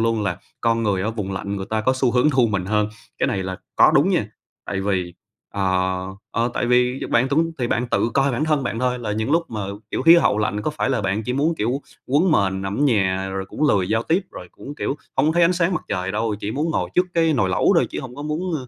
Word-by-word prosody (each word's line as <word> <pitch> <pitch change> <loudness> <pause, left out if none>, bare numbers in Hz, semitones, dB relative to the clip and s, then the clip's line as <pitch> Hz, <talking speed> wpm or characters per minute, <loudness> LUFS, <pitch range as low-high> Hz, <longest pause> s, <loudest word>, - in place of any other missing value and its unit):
luôn 115 -1 +1
là 90 -3 -2 0.2
con 115 0 +1
người 100 -4 0
ở 110 - -1
vùng 105 -4 -4
lạnh 100 +1 -4
người 95 0 -5
ta 110 0 0
có 130 +4 +2
xu 130 -1 +1
hướng 125 +5 +3
thu 130 -4 +3
mình 100 -3 -1
hơn. 105 0 +1 0.3
Cái - - +2
này 95 - -1
là 95 0 -4 0.2
có - - +6
đúng - - +4
nha, - - +1 0.4
tại 95 -1 -2
vì, 95 -3 -1 0.4
ờ, 95 -1 0 0.3
ờ, 115 +2 0
tại - - 0
vì 125 +1 +2
bạn 125 +3 +3
túng 165 +4 +1
thì 120 - 0
bạn 120 +1 0
tự 115 - +1
coi 135 0 +2
bản 135 +5 0
thân 150 -3 +1
bạn 115 -2 -3
thôi 125 0 0
là 105 -3 -3
những 110 +5 -2
lúc 165 +1 +1
mà, 110 -2 -4 0.3
kiểu, - - -2
khí 165 +1 +8
hậu 105 -10 +3
lạnh 105 -1 -1
có - - -1
phải 145 -3 -2
là 125 - +1
bạn 100 +3 -1
chỉ 125 - -2
muốn, 150 +5 +1
kiểu, 125 +6 -1 0.2
quấn 155 +7 +3
mền 95 -5 +1
nằm 95 +4 -3
ở - - +2
nhà 95 -7 +1
rồi 95 0 -3
cũng 150 - 0
lười 95 -6 +2
giao 110 +2 +1
tiếp, 175 +8 +1
rồi 90 - -9
cũng, 145 - -9
kiểu, 145 - -2 0.2
hông 135 - +3
có 155 - +3
thấy 175 - +4
ánh 170 +2 +5
sáng 175 +1 +1
mặt - - -2
trời 95 +1 -2
đâu, 110 0 -1
chỉ 100 - -3
muốn 155 +4 -1
ngồi - - -1
trước 180 +1 +3
cái 165 -1 +3
nồi 105 -10 +1
lẩu 90 - +3
thôi - - +3
chứ - - -4
hông 130 0 -9
có 145 - -6
muốn 160 +4 -2
115 Hz, 275 wpm, -22 LUFS, 100-145 Hz, 0.4 s, khí